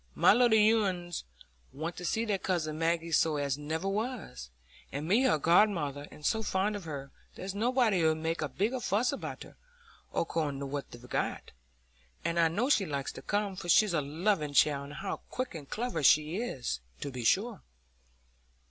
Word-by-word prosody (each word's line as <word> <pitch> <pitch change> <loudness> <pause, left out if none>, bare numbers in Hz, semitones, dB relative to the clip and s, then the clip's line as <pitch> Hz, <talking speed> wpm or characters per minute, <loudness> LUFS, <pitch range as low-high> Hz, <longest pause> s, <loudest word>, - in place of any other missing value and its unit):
My - - +6
little 220 -2 +5
uns 175 -3 -3 0.5
want 160 +4 -5
to 180 - -6
see 225 +5 0
their 205 -3 0
cousin 160 -5 -1
Maggie 165 0 0
so 160 -1 +3
as 140 -2 0
never 155 +5 -3
was. 205 - -3 0.4
And 145 +3 -4
me 225 +9 +4
her 250 - +4
godmother, 150 -4 +2
and 150 - -12
so 220 - +2
fond 205 0 0
of 200 -4 -6
her; 140 -3 -6 0.2
there's 190 +1 -5
nobody 225 -4 +2
'ud 160 0 +3
make 165 +1 -2
a 155 - -1
bigger 215 - -1
fuss 230 +1 +1
with 280 - -5
her, - - -16 0.5
according 155 -4 -1
to - - -3
what 140 0 -4
they've 120 +1 -12
got. - - -2 0.7
And 170 0 0
I 165 - +5
know 205 +10 0
she 210 -10 +3
likes 140 -2 -3
to - - -10
come, 205 -1 -1
for 175 -2 -7
she's 210 +2 +5
a 155 - +2
loving 150 +1 0
child, 140 0 +3
and 145 - -9
how 195 +5 -4
quick 255 +1 -3
and 150 -4 -9
clever 220 -8 -2
she 155 +4 +4
is, 130 - -3 0.2
to 140 - -4
be 125 -2 -5
sure!" 205 - +1
170 Hz, 185 wpm, -30 LUFS, 150-210 Hz, 0.7 s, My